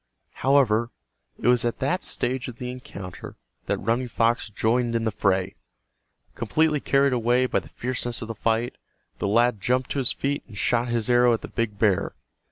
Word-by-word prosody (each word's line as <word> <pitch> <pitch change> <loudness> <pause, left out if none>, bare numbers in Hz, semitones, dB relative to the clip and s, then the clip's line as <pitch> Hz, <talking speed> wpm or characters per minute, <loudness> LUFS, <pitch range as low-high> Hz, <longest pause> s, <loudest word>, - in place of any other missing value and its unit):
However, 120 -5 +3 0.5
it - - -2
was 125 -1 +4
at 120 -1 -1
that 155 +7 0
stage 130 +2 -2
of 125 - -7
the 125 +1 -5
encounter 100 -7 -9 0.3
that - - +1
Running 115 +5 0
Fox 115 0 +1
joined 115 +3 0
in 115 - 0
the 110 - 0
fray. 95 -2 0 0.8
Completely 150 +6 +1
carried 140 -1 +2
away 120 +1 +2
by - - +1
the - - -14
fierceness 120 -1 -3
of - - -7
the 115 - -4
fight, 115 +2 -1 0.4
the - - -1
lad 115 0 +2
jumped 125 +4 0
to 140 - -1
his 130 - +2
feet 140 +1 -2
and 105 - -12
shot 120 +3 +1
his 120 -2 -1
arrow 120 -1 +5
at 115 - -1
the - - -7
big 115 -3 -2
bear. 100 -4 +1
120 Hz, 185 wpm, -25 LUFS, 115-125 Hz, 0.8 s, arrow